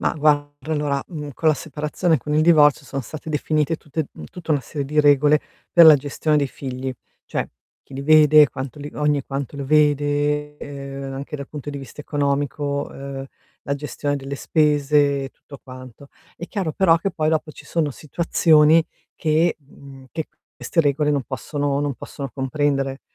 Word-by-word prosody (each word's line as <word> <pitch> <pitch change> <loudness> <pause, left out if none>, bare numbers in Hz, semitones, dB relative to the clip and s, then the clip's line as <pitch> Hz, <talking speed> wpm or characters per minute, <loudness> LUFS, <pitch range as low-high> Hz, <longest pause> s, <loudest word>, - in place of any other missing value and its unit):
Ma - - +1
guarda 145 -1 0
allora, 145 -2 -1
mhmm, 150 -4 -6
con 160 +5 +1
la 155 - +4
separazione 155 +3 -1
e - - +2
con 150 +4 -3
il 155 - +4
divorzio 150 -3 +5
sono 135 - -4
state 155 +5 -8
definite 155 +1 0
tutte 150 0 -4 0.2
tutta 175 -2 -9
una 145 - +1
serie 140 +3 -5
di 150 +2 +2
regole 145 +1 +4 0.3
per 170 -1 +8
la 155 -2 +10
gestione 145 +2 -1
dei 145 -2 +2
figli, 130 -1 -5 0.3
cioè - - -3 0.3
chi 135 - -14
li 135 - -5
vede, 155 0 +7
quanto 135 +3 -6
li 145 +1 -7
ogni 150 -1 +1
quanto 140 0 -5
lo 140 - -4
vede, 150 0 +1
ehm, 140 -1 -7
anche 140 +2 -6
dal 140 -1 -8
punto 145 -1 -7
di 140 - -6
vista 135 +2 -10
economico, 145 0 -1
uhm, 135 0 -7 0.4
la 140 - -2
gestione 145 0 -3
delle 135 0 -6
spese 145 -2 +2
e - - -5
tutto 140 - -14
quanto. 130 +1 -12 0.3
È 175 - -7
chiaro 190 -7 -3
però 170 -2 +4
che 195 +4 -2
poi 155 -1 0
dopo 160 -1 -1
ci - - -14
sono 155 -4 -1
situazioni 160 +1 +3 0.3
che 160 +2 +1
mhmm, 135 -2 -15
che 160 - -4 0.3
queste 165 - 0
regole 145 +1 +1
non 140 -2 +1
possono 145 +3 -2
non 145 -2 -1
possono 135 0 -7
comprendere, 135 0 -1
145 Hz, 180 wpm, -22 LUFS, 140-155 Hz, 0.4 s, la